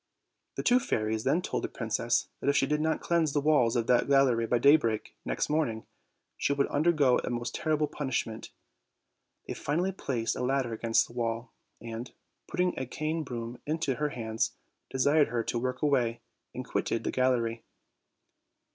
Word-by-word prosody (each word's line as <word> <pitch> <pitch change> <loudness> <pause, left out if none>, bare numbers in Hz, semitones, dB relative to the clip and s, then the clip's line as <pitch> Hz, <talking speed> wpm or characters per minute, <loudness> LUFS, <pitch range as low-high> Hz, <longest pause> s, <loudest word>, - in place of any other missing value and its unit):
The - - -3
two 245 +1 +5
fairies 110 - -1
then 175 - +2
told - - -2
the - - 0
princess 115 +1 -1
that - - 0
if 140 - +3
she 135 - +3
did 150 +2 0
not 160 +1 0
cleanse 165 -4 +1
the 145 - +2
walls 145 -6 +3
of 120 -2 +1
that 125 +1 +3
gallery 130 -5 +3
by 120 - +2
daybreak 120 -4 +3
next - - -1
morning, 145 -8 -1 0.5
she 140 - +1
would 140 0 +2
undergo 145 -4 +3
the - - -4
most 120 0 -3
terrible 155 -1 +1
punishment. 130 -7 -3 1.0
They - - -3
finally 175 +6 -1
placed 125 -11 -2
a - - -4
ladder 130 -2 0
against 115 0 +2
the - - -15
wall, 115 0 -3 0.3
and, 115 +2 -7 0.4
putting 180 0 0
a 130 - -3
cane 155 +5 -2
broom 120 -3 -6
into 155 -3 0
her 150 +3 -1
hands, 110 -4 -2 0.4
desired 145 +3 +3
her 120 -1 -1
to 120 - -2
work 125 +4 -3
away, 125 -6 +1 0.3
and - - -5
quitted - - -1
the - - -1
gallery. 120 -3 +1
130 Hz, 175 wpm, -29 LUFS, 115-150 Hz, 1.0 s, two